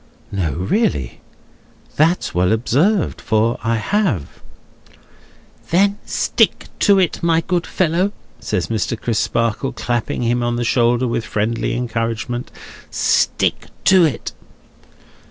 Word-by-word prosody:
"No, 90 Hz, -7 st, -1 dB
really? 95 Hz, -, -1 dB, 0.7 s
That's 165 Hz, +4 st, +2 dB
well 90 Hz, +1 st, +2 dB
observed; 150 Hz, -, +1 dB
for 110 Hz, +2 st, +1 dB
I 115 Hz, 0 st, +1 dB
have." 130 Hz, -, -1 dB, 1.3 s
"Then 200 Hz, +4 st, +2 dB
stick -, -, +1 dB
to 200 Hz, -2 st, +5 dB
it, 185 Hz, -2 st, +1 dB
my 165 Hz, -1 st, +2 dB
good 175 Hz, +1 st, -1 dB
fellow," 185 Hz, +3 st, +1 dB, 0.3 s
says 90 Hz, -, -2 dB
Mr. 110 Hz, +2 st, -2 dB
Crisparkle, 115 Hz, +2 st, -1 dB
clapping 120 Hz, 0 st, -2 dB
him 120 Hz, +1 st, +1 dB
on 120 Hz, 0 st, 0 dB
the 120 Hz, -, -1 dB
shoulder 120 Hz, +1 st, +2 dB
with 115 Hz, -1 st, -1 dB
friendly 110 Hz, +2 st, -1 dB
encouragement, 120 Hz, 0 st, -3 dB, 0.4 s
"stick -, -, +1 dB, 0.2 s
to 190 Hz, -2 st, +6 dB
it." 145 Hz, -8 st, -1 dB
120 Hz, 115 wpm, -19 LUFS, 110-170 Hz, 1.3 s, to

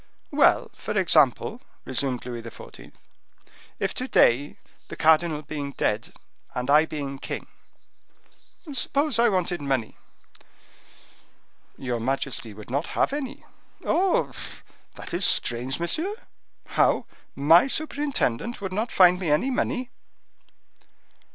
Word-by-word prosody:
"Well, -, -, +3 dB
for -, -, -4 dB
example," -, -, +3 dB, 0.2 s
resumed 130 Hz, -1 st, -2 dB
Louis 120 Hz, -2 st, -5 dB
XIV., 115 Hz, 0 st, -12 dB, 0.9 s
"if -, -, -1 dB
to -, -, -3 dB
day, 140 Hz, +5 st, +3 dB, 0.3 s
the -, -, -7 dB
cardinal 160 Hz, -1 st, +3 dB
being 140 Hz, -1 st, -5 dB
dead, 105 Hz, -1 st, -1 dB, 0.4 s
and 125 Hz, +2 st, -1 dB
I 155 Hz, +2 st, +6 dB
being 140 Hz, -3 st, -5 dB
king, -, -, -5 dB, 1.3 s
suppose 280 Hz, 0 st, 0 dB
I 235 Hz, 0 st, +5 dB
wanted 180 Hz, -4 st, -1 dB
money?" 135 Hz, -5 st, -2 dB, 1.8 s
"Your 125 Hz, -3 st, -3 dB
majesty 130 Hz, -1 st, -2 dB
would 105 Hz, +3 st, -11 dB
not 140 Hz, +5 st, -1 dB
have -, -, +2 dB
any." 285 Hz, -1 st, -5 dB, 0.4 s
"Oh! 365 Hz, +3 st, +2 dB, 0.6 s
that -, -, -9 dB
is 175 Hz, +3 st, 0 dB
strange, 125 Hz, 0 st, +1 dB
monsieur! 320 Hz, -, -1 dB, 0.5 s
How! -, -, +2 dB, 0.3 s
my 160 Hz, -, +6 dB
superintendent 275 Hz, -, -1 dB
would 190 Hz, -2 st, -5 dB
not 220 Hz, +4 st, -2 dB
find 180 Hz, -1 st, +6 dB
me 180 Hz, -4 st, -2 dB
any 195 Hz, -, +2 dB
money?" 255 Hz, 0 st, -1 dB
155 Hz, 115 wpm, -25 LUFS, -, 1.8 s, I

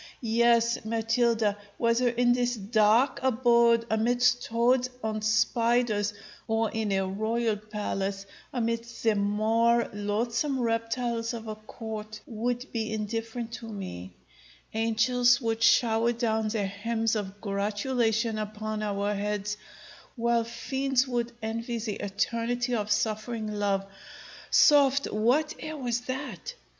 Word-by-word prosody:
Yes, 235 Hz, 0 st, +3 dB
Matilda, 225 Hz, -1 st, +1 dB, 0.2 s
whether 235 Hz, +1 st, +2 dB
in 240 Hz, +1 st, +3 dB
this 245 Hz, 0 st, 0 dB
dark 220 Hz, +4 st, +3 dB
abode, 235 Hz, -2 st, +4 dB
amidst 245 Hz, +3 st, +2 dB
toads 245 Hz, +2 st, +2 dB
and 215 Hz, -1 st, -2 dB
spiders, 220 Hz, -1 st, +2 dB, 0.4 s
or 225 Hz, 0 st, +1 dB
in 220 Hz, -2 st, -2 dB
a 195 Hz, -1 st, +1 dB
royal 220 Hz, +3 st, 0 dB
palace, 200 Hz, -2 st, -4 dB, 0.3 s
amidst 230 Hz, -1 st, -3 dB
the 225 Hz, -1 st, +4 dB
more 220 Hz, +3 st, +2 dB
loathsome 230 Hz, +7 st, -1 dB
reptiles 230 Hz, 0 st, -1 dB
of 225 Hz, -1 st, -8 dB
a 215 Hz, -, -3 dB
court, 215 Hz, 0 st, -8 dB
would 245 Hz, 0 st, -2 dB
be 225 Hz, -1 st, -2 dB
indifferent 225 Hz, +2 st, -4 dB
to 230 Hz, -, -9 dB
me; 95 Hz, -, -7 dB, 0.6 s
angels 240 Hz, +3 st, +3 dB
would 225 Hz, -3 st, -2 dB
shower 230 Hz, 0 st, +4 dB
down 220 Hz, -2 st, 0 dB
their 215 Hz, -2 st, -1 dB
hymns 225 Hz, +3 st, -1 dB
of 205 Hz, -1 st, -4 dB
gratulation 220 Hz, +2 st, 0 dB
upon 215 Hz, 0 st, -4 dB
our 205 Hz, 0 st, -1 dB
heads, 210 Hz, 0 st, -2 dB, 0.6 s
while 235 Hz, -1 st, +1 dB
fiends 265 Hz, +3 st, -1 dB
would 240 Hz, -1 st, -1 dB
envy 230 Hz, +2 st, -3 dB
the 215 Hz, -2 st, -4 dB
eternity 230 Hz, +5 st, -1 dB
of 210 Hz, -3 st, -1 dB
suffering 215 Hz, +1 st, -1 dB
love 200 Hz, -1 st, 0 dB, 0.6 s
Soft; 280 Hz, -2 st, +5 dB
what 250 Hz, +9 st, +2 dB
air 310 Hz, 0 st, -6 dB
was 240 Hz, -3 st, -1 dB
that? 265 Hz, -, -5 dB
225 Hz, 120 wpm, -28 LUFS, 215-240 Hz, 0.6 s, Soft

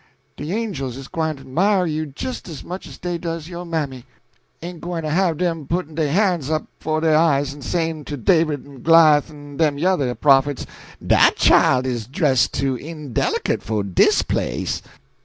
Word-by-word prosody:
De 150 Hz, +4 st, -6 dB
angels 185 Hz, -, -3 dB
is 135 Hz, -1 st, -9 dB
gwine 160 Hz, -1 st, -2 dB
to 135 Hz, -1 st, -14 dB
'mire 185 Hz, +8 st, +2 dB
you 155 Hz, -1 st, -2 dB
jist 185 Hz, -, -6 dB
as 155 Hz, -, -8 dB
much 180 Hz, +2 st, -7 dB
as -, -, -11 dB
dey 175 Hz, -1 st, -4 dB
does 165 Hz, -2 st, -5 dB
yo' 175 Hz, 0 st, -7 dB
mammy. 150 Hz, -7 st, -3 dB, 0.6 s
Ain't 175 Hz, -1 st, -7 dB
gwine 170 Hz, -1 st, -4 dB
to 155 Hz, -, -2 dB
have 170 Hz, -1 st, +1 dB
'em 165 Hz, -5 st, -1 dB
putt'n' 170 Hz, -2 st, -2 dB
dey 155 Hz, -1 st, 0 dB
han's 175 Hz, -3 st, +1 dB
up 155 Hz, -1 st, -1 dB
'fo' 155 Hz, 0 st, -1 dB
dey 160 Hz, -1 st, +2 dB
eyes 145 Hz, -3 st, +2 dB
en 145 Hz, -, -12 dB
sayin' 160 Hz, 0 st, -2 dB
to 145 Hz, -, -5 dB
David 155 Hz, -, +1 dB
en 140 Hz, -3 st, -13 dB
Goliah 160 Hz, -2 st, +6 dB
en 145 Hz, -2 st, -11 dB
dem 150 Hz, -3 st, +2 dB
yuther 145 Hz, -7 st, +1 dB
prophets, 140 Hz, -1 st, +3 dB, 0.4 s
'Dat -, -, +5 dB
chile 130 Hz, 0 st, +4 dB
is 120 Hz, -4 st, -3 dB
dress' 130 Hz, -, +2 dB
too 135 Hz, +7 st, -1 dB
indelicate 150 Hz, -1 st, -2 dB
fo' 105 Hz, -2 st, -2 dB
dis 95 Hz, -3 st, +3 dB
place.'" -, -, -2 dB
155 Hz, 180 wpm, -21 LUFS, 140-170 Hz, 0.6 s, Goliah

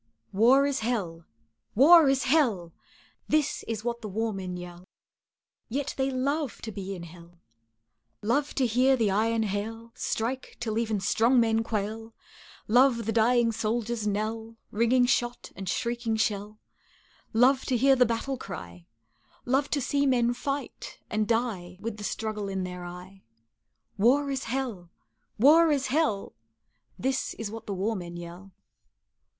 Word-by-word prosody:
War 250 Hz, +7 st, +5 dB
is 280 Hz, -1 st, 0 dB
hell! 190 Hz, -8 st, -3 dB, 0.5 s
war 305 Hz, +5 st, +8 dB
is 270 Hz, -1 st, +2 dB
hell! 235 Hz, -, +1 dB, 0.5 s
This 305 Hz, -2 st, +1 dB
is 220 Hz, -2 st, -3 dB
what 235 Hz, 0 st, -3 dB
the 215 Hz, -, -6 dB
war 220 Hz, +3 st, -2 dB
men 185 Hz, -2 st, -5 dB
yell 175 Hz, 0 st, -9 dB, 0.9 s
Yet 275 Hz, +4 st, -2 dB
they 265 Hz, 0 st, 0 dB
love 275 Hz, +1 st, -2 dB
to 220 Hz, -, -5 dB
be 195 Hz, -1 st, -5 dB
in 175 Hz, -, -8 dB
hell, 170 Hz, 0 st, -14 dB, 0.8 s
Love 280 Hz, +7 st, 0 dB
to 265 Hz, -, +2 dB
hear 255 Hz, +3 st, +3 dB
the 220 Hz, -4 st, +1 dB
iron 225 Hz, +3 st, +1 dB
hail 220 Hz, +3 st, -4 dB
Strike, 250 Hz, +4 st, -3 dB
till 225 Hz, -2 st, -2 dB
even 220 Hz, -3 st, -1 dB
strong 230 Hz, +5 st, +3 dB
men 225 Hz, -1 st, +2 dB
quail; 225 Hz, +1 st, -4 dB, 0.5 s
Love 245 Hz, 0 st, +4 dB
the 225 Hz, -, 0 dB
dying 230 Hz, +1 st, +3 dB
soldier's 225 Hz, 0 st, -2 dB
knell, 220 Hz, +2 st, -3 dB
Ringing 235 Hz, +3 st, +3 dB
shot 245 Hz, -1 st, -1 dB
and 190 Hz, -1 st, -5 dB
shrieking 235 Hz, +1 st, -1 dB
shell, 210 Hz, -1 st, -2 dB, 0.7 s
Love 255 Hz, +4 st, +4 dB
to 255 Hz, -, +1 dB
hear 270 Hz, +3 st, +5 dB
the 250 Hz, -, +5 dB
battle 245 Hz, +3 st, -2 dB
cry, 85 Hz, -, -9 dB, 0.6 s
Love 270 Hz, +3 st, +1 dB
to 290 Hz, -, 0 dB
see 280 Hz, +2 st, +1 dB
men 240 Hz, -2 st, +2 dB
fight 275 Hz, +3 st, -5 dB
and 215 Hz, -1 st, 0 dB
die 215 Hz, -7 st, -1 dB
With 215 Hz, +1 st, -5 dB
the 210 Hz, -, -8 dB
struggle 210 Hz, -1 st, -3 dB
in 190 Hz, -1 st, -2 dB
their 180 Hz, -1 st, -6 dB
eye 180 Hz, +2 st, -10 dB, 0.8 s
War 275 Hz, +6 st, +3 dB
is 270 Hz, 0 st, -3 dB
hell 230 Hz, -8 st, -4 dB, 0.5 s
war 315 Hz, +8 st, +6 dB
is 275 Hz, -3 st, 0 dB
hell, 290 Hz, -11 st, 0 dB, 0.6 s
This 265 Hz, +1 st, -2 dB
is 220 Hz, -2 st, -5 dB
what 225 Hz, 0 st, -9 dB
the 200 Hz, -, -3 dB
war 210 Hz, +4 st, -1 dB
men 175 Hz, -2 st, -7 dB
yell. 175 Hz, +3 st, -10 dB
225 Hz, 150 wpm, -27 LUFS, 205-255 Hz, 0.9 s, war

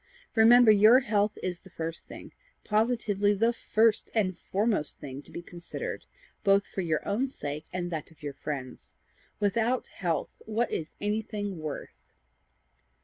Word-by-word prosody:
Remember 235 Hz, +1 st, +7 dB
your 215 Hz, +5 st, +7 dB
health 210 Hz, -3 st, +1 dB
is 180 Hz, -1 st, -2 dB
the 190 Hz, -, -16 dB
first 165 Hz, -1 st, -6 dB
thing -, -, -10 dB, 0.3 s
positively 210 Hz, -2 st, +1 dB
the 230 Hz, +4 st, +2 dB
FIRST 225 Hz, -1 st, +2 dB
and 190 Hz, -5 st, +1 dB
foremost 205 Hz, -5 st, 0 dB
thing 135 Hz, 0 st, -7 dB
to -, -, -19 dB
be 175 Hz, -, -7 dB
considered, 175 Hz, 0 st, -6 dB, 0.4 s
both 200 Hz, 0 st, +4 dB
for 195 Hz, -, -4 dB
your 160 Hz, -4 st, -1 dB
own 225 Hz, +7 st, +1 dB
sake 150 Hz, -, -6 dB
and 180 Hz, -1 st, -3 dB
that 160 Hz, -3 st, -4 dB
of 160 Hz, -2 st, -21 dB
your 145 Hz, -1 st, -4 dB
friends. 135 Hz, -2 st, -6 dB, 0.4 s
Without 230 Hz, +4 st, +1 dB
health, 165 Hz, -6 st, -2 dB, 0.2 s
what 225 Hz, +2 st, 0 dB
is 155 Hz, -, -4 dB
anything 205 Hz, -2 st, -2 dB
worth?" 155 Hz, -2 st, -6 dB
200 Hz, 145 wpm, -29 LUFS, 165-220 Hz, 0.4 s, Remember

